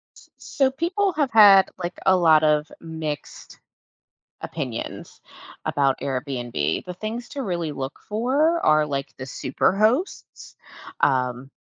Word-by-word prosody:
S - - -19
so 265 -2 0
people 365 +6 -1
have 290 -4 0
had, 200 -3 +7
like, 175 +1 -5
a 190 -1 +5
lot 160 -3 +4
of 150 0 +1
mixed 160 -3 -7 0.8
opinions - - -6 0.4
about 135 -2 +1
Airbnb. 125 - -3
The 180 - -6
things 225 +5 -6
to 275 -2 -5
really 170 -5 -3
look 135 -1 -6
for 280 +10 +1
are 155 0 +4
like 140 -1 -4
the 130 - -5
super 130 +7 -1
hosts. 230 - -1 0.5
Um, 130 -1 0
170 Hz, 130 wpm, -23 LUFS, -, 0.8 s, had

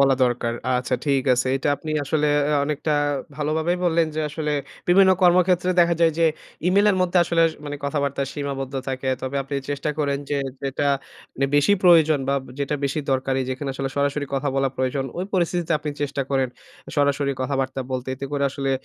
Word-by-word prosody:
বলা 135 -1 +5
দরকার। 120 -1 0 0.3
আচ্ছা 125 0 -1
ঠিক 140 -2 +2
আছে। 125 +1 0
এটা 135 - -2
আপনি 155 +2 -7
আসলে 150 +2 +1 0.2
অ্যা 150 0 +2
অনেকটা 150 +1 -1 0.4
ভালোভাবেই 160 +4 0
বললেন, 165 -1 +3
যে 155 - -1
আসলে 150 0 -3 0.4
বিভিন্ন 190 +1 +6
কর্মক্ষেত্রে 180 0 +4
দেখা 170 0 +4
যায় 165 -1 +4
যে 165 - +4 0.4
ইমেইলের 200 +1 +4
মধ্যে 180 0 +2
আসলে 170 -1 +2
স - - -10
মানে 145 0 -4
কথাবার্তা 140 -1 -1
সীমাবদ্ধ 140 -2 -4
থাকে। 130 0 -3
তবে 130 +1 -3
আপনি 135 +1 -6 0.2
চেষ্টা 145 +1 -2
করেন 140 -2 0
যে 145 - +1 0.2
যেটা 140 +1 -1 0.5
মানে 135 - 0
বেশি 145 +7 +4
প্রয়োজন 160 -4 +6
বা 140 - +2 0.2
যেটা 140 +1 -1
বেশি 140 +3 -1
দরকারি 130 0 0
যেখানে 135 +2 -4
আসলে 135 0 -2
সরাসরি 145 0 0
কথা 135 +1 0
বলা 135 0 +2
প্রয়োজন, 130 +1 -1
ওই 185 - -2
পরিস্থিতিতে 175 -1 0
আপনি 150 0 -4
চেষ্টা 140 -1 -1
করেন 135 -2 +1 0.5
সরাসরি 140 -1 +2
কথাবার্তা 135 0 -1
বলতে। 130 0 -3
এতে 135 +1 -6
করে 140 -1 0
আসলে 135 0 -2
145 Hz, 180 wpm, -23 LUFS, 135-160 Hz, 0.5 s, বিভিন্ন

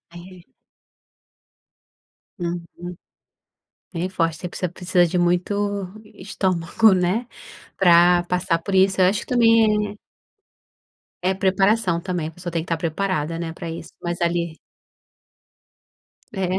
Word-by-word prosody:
É. 180 0 -13 1.9
Uhum, 175 0 -6 1.0
bem 175 +2 -2
forte, 165 -4 -1
você 180 - -5
precisa 180 0 -3
precisa 180 0 +1
de 175 +1 -1
muito 175 +3 +1 0.5
estômago, 190 +1 +1
né, 185 +6 0 0.5
pra 175 -1 +5
passar 175 -1 0
por 165 +4 -6
isso 190 0 +3
eu 185 - +6
acho 200 +3 +1
que - - -8
também 220 -4 +3 1.3
é 190 - +3
preparação 195 -1 +1
também, 175 -4 -3
a - - -7
pessoa 175 +1 -7
tem 165 -1 -1
que - - -12
estar 165 - -1
preparada, 165 -1 -2
né, 170 -1 -4
pra 170 -1 -6
isso 165 - -8
mas 175 0 -3
ali 170 -1 -1 1.8
É 190 -2 -2
180 Hz, 125 wpm, -22 LUFS, 170-190 Hz, 1.9 s, eu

